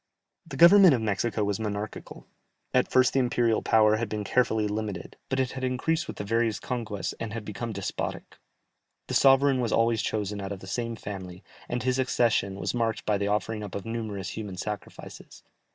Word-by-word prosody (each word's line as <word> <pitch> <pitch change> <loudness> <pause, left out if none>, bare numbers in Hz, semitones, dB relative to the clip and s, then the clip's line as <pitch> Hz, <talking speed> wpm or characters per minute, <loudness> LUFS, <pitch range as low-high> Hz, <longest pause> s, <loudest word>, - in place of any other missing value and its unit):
The - - -7
Government 180 -2 +8
of 120 - -2
Mexico 110 +1 0
was 100 +1 -1
monarchical; 105 -1 -5 0.5
at 125 - +3
first 130 -1 +4
the 135 - +3
imperial 120 -2 +2
power 110 -1 +4
had 115 -1 -3
been 105 0 -3
carefully 110 -1 +1
limited, 105 -2 -4
but 130 - 0
it 130 -1 0
had 130 0 -6
increased 130 +6 0
with - - -7
the - - -4
various 115 +1 0
conquests, 115 -5 -4
and 110 -1 -5
had 115 -2 -5
become 115 +3 -5
despotic. 100 -2 -5 0.7
The - - -5
sovereign 135 -1 +5
was 115 -3 -1
always 115 -1 +2
chosen 105 -1 -2
out 95 0 -5
of 100 - -5
the 95 - -11
same 115 +4 -3
family, 95 -4 -8 0.3
and 120 - -2
his 130 0 +1
accession 115 -6 +1
was - - -2
marked 115 -2 -1
by 105 -2 +1
the 100 - 0
offering 105 +1 -1
up 100 - -7
of 100 - -5
numerous 110 -5 -4
human 100 -4 -6
sacrifices. 105 +1 -8
110 Hz, 190 wpm, -27 LUFS, 105-125 Hz, 0.7 s, Government